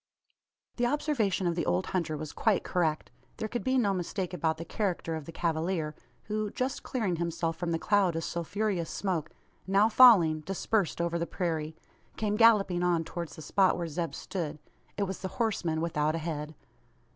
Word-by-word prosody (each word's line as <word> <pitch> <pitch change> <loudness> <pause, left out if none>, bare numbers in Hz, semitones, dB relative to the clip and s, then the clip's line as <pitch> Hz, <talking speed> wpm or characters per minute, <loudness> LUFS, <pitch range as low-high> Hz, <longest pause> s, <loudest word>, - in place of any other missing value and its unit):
The 240 0 +2
observation 240 -10 0
of 170 - +2
the 170 - -2
old 185 +1 +1
hunter 165 -4 -1
was 150 0 -6
quite 215 -4 +2
correct. 160 -4 -1 0.3
There 220 - -2
could 240 +2 -4
be 260 0 +2
no 205 -6 +2
mistake 185 0 -3
about 160 -2 0
the 165 - -6
character 175 -4 -2
of 155 -2 -6
the 165 - -8
cavalier, 165 -1 -1 0.3
who, 215 0 -2
just 255 +5 -2
clearing 205 -9 -1
himself 170 -1 -1
from 170 +1 -3
the 165 - +1
cloud 195 -1 +2
of 165 - -2
sulphureous 175 +1 -2
smoke 175 -6 -2 0.4
now 200 +3 +4
falling, 205 -10 +7
dispersed 195 +3 -1
over 170 0 0
the 170 - -2
prairie 160 -4 -2 0.4
came 210 -1 0
galloping 210 -6 +5
on 175 -2 +2
towards 170 0 -6
the 160 - -9
spot 190 +5 +3
where 175 - -2
Zeb 165 -1 -3
stood. 160 -5 -4 0.4
It 205 - +1
was 190 -1 -3
the 190 - -3
horseman 185 -9 0
without 155 -2 0
a - - 0
head. 155 -2 -4
175 Hz, 180 wpm, -29 LUFS, 165-205 Hz, 0.4 s, falling